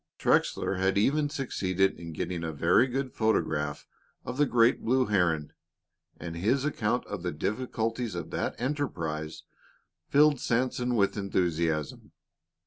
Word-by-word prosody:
Trexler 95 - +1
had 95 +1 +1
even 145 +8 +2
succeeded 95 - 0
in 85 -1 -7
getting 85 +2 -4
a 80 - -2
very 85 - +3
good 130 0 -3
photograph 75 -10 0 0.4
of 125 - -5
the 145 0 +3
great 120 0 +3
blue 130 +2 +2
heron, 85 -8 +1 0.7
and 85 -1 -6
his 115 +11 +1
account 120 -5 0
of - - -6
the 90 0 -2
difficulties 115 +4 -2
of 85 -2 -5
that - - -3
enterprise 85 - -3 0.7
filled 145 -1 +5
Sanson 125 0 0
with 100 -1 +2
enthusiasm. 85 -6 -1
105 Hz, 135 wpm, -28 LUFS, 85-125 Hz, 0.7 s, filled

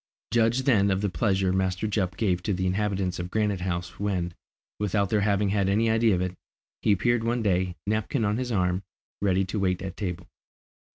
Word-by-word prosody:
Judge 115 +2 +2
then 105 -7 +4
of 95 0 +1
the 100 -2 0
pleasure 95 +2 +1
Master 95 +1 0
Jup 95 -4 -1
gave 90 -5 +1
to 100 +3 -1
the 95 +1 -1
inhabitants 95 -1 -1
of 90 +1 -4
Granite 105 -2 0
House 90 -1 -3
when, 90 -4 -1 0.5
without 100 -1 0
their 105 -2 +3
having 100 0 +2
had 100 -1 +1
any 110 +3 +2
idea 110 -2 +3
of 90 - -1
it, 90 0 -2 0.5
he - - +3
appeared 120 +4 +2
one 115 0 0
day, 90 -3 +1
napkin 110 +4 0
on 105 +2 +1
his 125 -1 -3
arm, 90 -3 +1 0.4
ready 95 -1 +2
to 100 +3 -3
wait 90 -2 0
at 95 -1 -5
table. 90 -3 -4
100 Hz, 195 wpm, -26 LUFS, 90-110 Hz, 0.5 s, then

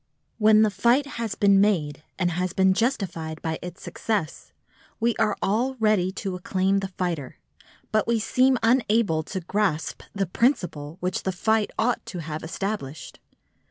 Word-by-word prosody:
When 215 0 +6
the 215 - +2
fight 235 +8 +3
has 230 -6 -4
been 200 -1 +5
made 155 -9 +1 0.2
and 175 -2 +1
has 180 +1 -2
been 190 0 +4
justified 185 - -2
by 160 -1 -2
its 180 0 -8
success, 210 -9 -3 0.5
we 235 0 +1
are 210 - +1
all 240 +7 +1
ready 215 -6 +2
to 195 -1 -4
acclaim 190 +2 0
the 195 - -3
fighter, 175 -7 -4 0.5
but 215 0 +1
we 235 0 +2
seem 255 +4 +3
unable 225 -8 +3
to 190 +4 -5
grasp 180 -3 -1
the 195 -1 -1
principle 175 - 0
which 180 +1 -1
the 190 - -1
fight 215 +4 +1
ought 235 +2 +1
to 185 - -6
have 155 -2 -5
established. 160 -3 -5
195 Hz, 160 wpm, -25 LUFS, 175-220 Hz, 0.5 s, When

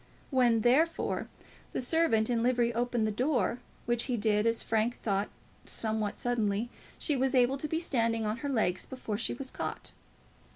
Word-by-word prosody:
When, 240 -4 +4
therefore, 295 +9 +2 0.5
the - - -1
servant 250 -6 +2
in 235 -2 +1
livery 240 -1 +2
opened 240 -1 0
the 215 - 0
door, 250 +1 0 0.3
which 240 -1 +1
he 250 -2 -1
did, 210 0 +2
as 230 0 +1
Frank 225 +2 0
thought 200 -1 0 0.4
somewhat 220 -2 -2
suddenly, 230 -1 0 0.3
she 300 - +1
was 265 0 +1
able 255 +2 +3
to 305 - -2
be 320 +2 -1
standing 230 -8 0
on 215 +2 -1
her 285 +2 -4
legs 215 -8 0
before 225 -5 -4
she 240 - -1
was 260 +1 -6
caught. - - -5
240 Hz, 170 wpm, -30 LUFS, 220-255 Hz, 0.5 s, When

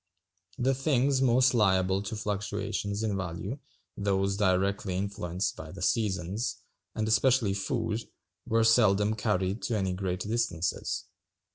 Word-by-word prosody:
The 130 +2 +2
things 135 0 +2
most 130 0 +4
liable 95 -4 +3
to 100 +2 -5
fluctuations 105 0 -3
in 105 -3 0
value, 95 - -4 0.4
those 100 -1 0
directly 95 -1 +1
influenced 95 -2 -2
by 80 - -9
the 95 0 -7
seasons, 100 +1 0 0.4
and 110 0 -1
especially 110 -1 +3
food, 110 +3 -2 0.4
were 115 -1 +3
seldom 110 -2 +4
carried 95 -1 -1
to 115 - -1
any 95 -2 0
great 90 -1 -3
distances. 105 -7 -1
105 Hz, 125 wpm, -29 LUFS, 95-115 Hz, 0.4 s, most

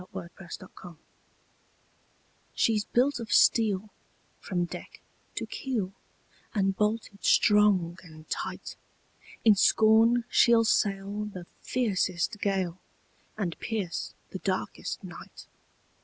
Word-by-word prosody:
THE 180 - -13
WORD 180 -3 -7
OF 190 - -11
AN 185 - -8
ENGINEER 175 -3 -13 1.6
"She's 215 -2 +2
built 260 +2 +1
of 230 -2 -7
steel 210 -2 +3 0.5
From 175 -2 -2
deck - - -9 0.4
to - - -2
keel, 225 - -3 0.6
And 195 -2 +1
bolted 210 0 -2
strong 200 -5 +4
and 155 -3 -14
tight; - - -5 0.7
In 220 - +8
scorn 225 +4 +4
she'll 235 -2 +5
sail 200 0 0
The 185 -4 -8 0.2
fiercest 200 -5 -1
gale, 190 -3 -1 0.6
And 180 -6 -2
pierce 205 -6 -3 0.2
the - - -5
darkest - - -3
night. - - -11
200 Hz, 110 wpm, -28 LUFS, 185-220 Hz, 1.6 s, In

